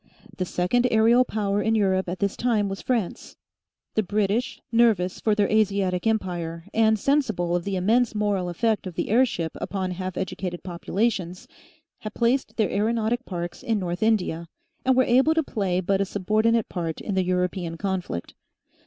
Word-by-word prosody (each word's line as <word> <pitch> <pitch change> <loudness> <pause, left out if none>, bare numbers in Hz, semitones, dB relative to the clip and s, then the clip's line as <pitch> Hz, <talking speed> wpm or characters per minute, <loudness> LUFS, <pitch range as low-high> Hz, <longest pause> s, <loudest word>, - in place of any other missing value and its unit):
The 185 - -2
second 180 +9 +1
aerial 230 +3 +5
power 205 -4 -1
in 220 +2 +1
Europe 190 -3 +1
at 180 - -3
this 200 +1 -1
time 225 -4 +1
was 195 - -5
France; 230 -8 -2 0.6
the 220 - +2
British, 210 +4 -1
nervous 225 -6 +3
for 215 -2 +1
their 205 -1 +2
Asiatic 200 -3 +1
empire, 175 -6 -2
and 220 -1 +3
sensible 220 -10 +1
of 175 - -2
the 200 -1 -2
immense 225 +5 +2
moral 205 -4 0
effect 210 +3 0
of 180 - -8
the - - -2
airship 220 -8 +2
upon 190 -2 -2
half 185 0 -5
educated 180 -2 -4
populations, 185 +2 -2 0.5
had 215 -1 -7
placed 245 +3 0
their 215 -3 +1
aeronautic 225 +3 0
parks 175 -2 -5
in 225 -2 0
North 175 -2 -3
India, 185 -7 +1 0.4
and 260 -1 +3
were 260 - +6
able 265 +6 +3
to 320 - +2
play 195 -9 -1
but 195 +2 +1
a - - +2
subordinate 215 +4 +1
part 165 -3 -4
in 205 - -4
the 190 -1 +2
European 180 -2 -1
conflict. 185 - -3
200 Hz, 170 wpm, -25 LUFS, 180-225 Hz, 0.6 s, were